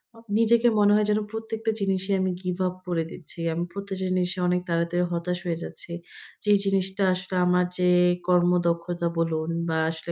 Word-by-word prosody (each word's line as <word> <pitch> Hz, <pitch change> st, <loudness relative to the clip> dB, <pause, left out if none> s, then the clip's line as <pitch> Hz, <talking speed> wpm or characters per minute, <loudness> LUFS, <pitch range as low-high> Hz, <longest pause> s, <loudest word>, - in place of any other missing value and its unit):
আ -, -, -16 dB, 0.2 s
নিজেকে 230 Hz, +1 st, +4 dB
মনে 205 Hz, 0 st, +5 dB
হয় 210 Hz, 0 st, +3 dB
যেন 210 Hz, -, +2 dB
প্রত্যেকটা 225 Hz, 0 st, -3 dB
জিনিসে 190 Hz, 0 st, 0 dB
আমি 185 Hz, 0 st, +1 dB
গিভআপ 180 Hz, 0 st, -1 dB
করে 170 Hz, -2 st, 0 dB
দিচ্ছি। 170 Hz, 0 st, -9 dB
আমি 170 Hz, +1 st, -1 dB
প্রত্যেকটা 200 Hz, -1 st, -5 dB
জিনিসে 185 Hz, +1 st, 0 dB
অনেক 180 Hz, 0 st, +1 dB
তাড়াতাড়ি 170 Hz, +1 st, +1 dB
হতাশ 175 Hz, +1 st, -2 dB
হয়ে 170 Hz, -2 st, -1 dB
যাচ্ছি। -, -, -8 dB, 0.5 s
যেই 205 Hz, -1 st, +5 dB
জিনিসটা 195 Hz, 0 st, 0 dB
আসলে 185 Hz, +1 st, -4 dB
আমার 180 Hz, 0 st, +3 dB
যে 180 Hz, 0 st, +3 dB, 0.4 s
কর্মদক্ষতা 175 Hz, -1 st, +2 dB
বলুন 160 Hz, -1 st, 0 dB, 0.2 s
বা 160 Hz, -, 0 dB
আসলে 165 Hz, +1 st, -6 dB
180 Hz, 165 wpm, -25 LUFS, 170-195 Hz, 0.5 s, মনে